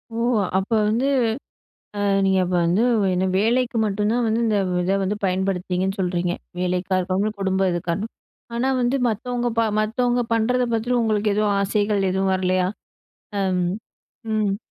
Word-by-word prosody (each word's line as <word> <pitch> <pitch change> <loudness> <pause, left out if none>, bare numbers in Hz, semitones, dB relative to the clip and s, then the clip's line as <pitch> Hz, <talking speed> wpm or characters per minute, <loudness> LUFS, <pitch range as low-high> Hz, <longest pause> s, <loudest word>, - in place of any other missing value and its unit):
ஓ - - -3 0.4
அப்ப 190 +3 -2 0.2
வந்து 230 +5 +1 0.9
அ - - -1 0.2
நீங்க 190 0 +3
அப்ப 180 - -3
வந்து 180 +6 +2 0.3
என்ன 180 +1 +1
வேலைக்கு 235 +3 +1
மட்டு 205 0 -2
தான் 240 0 +1
வந்து 220 +1 +1
இந்த 215 -2 +2 0.3
இத 190 +2 +1
வந்து 195 +2 -1
பயன்படுத்துனீங்கன்னு 190 0 -1
சொல்றீங்க. 175 -1 0 0.3
வேலைக்கா 180 +1 0
இருக்கட்டு 190 +4 0
குடும்ப 190 0 +1
இதுக்காரணம். 175 +5 -3 0.4
ஆனா 260 +3 +1
வந்து 245 +3 +1
மத்தவங்க 240 +2 -2 0.3
மத்தவங்க 245 +3 0
பண்ணுறத 245 +3 +2
பத்தி 240 +3 0
உங்களுக்கு 215 -2 +1
எதுவும் 210 -1 +1
ஆசைகள் 205 -1 +1
எதுவும் 190 0 +1
வரலையா? 185 -1 +1 0.7
ஆம் 185 -2 +1 0.7
ம். 205 -2 +1
200 Hz, 140 wpm, -22 LUFS, 185-225 Hz, 0.9 s, நீங்க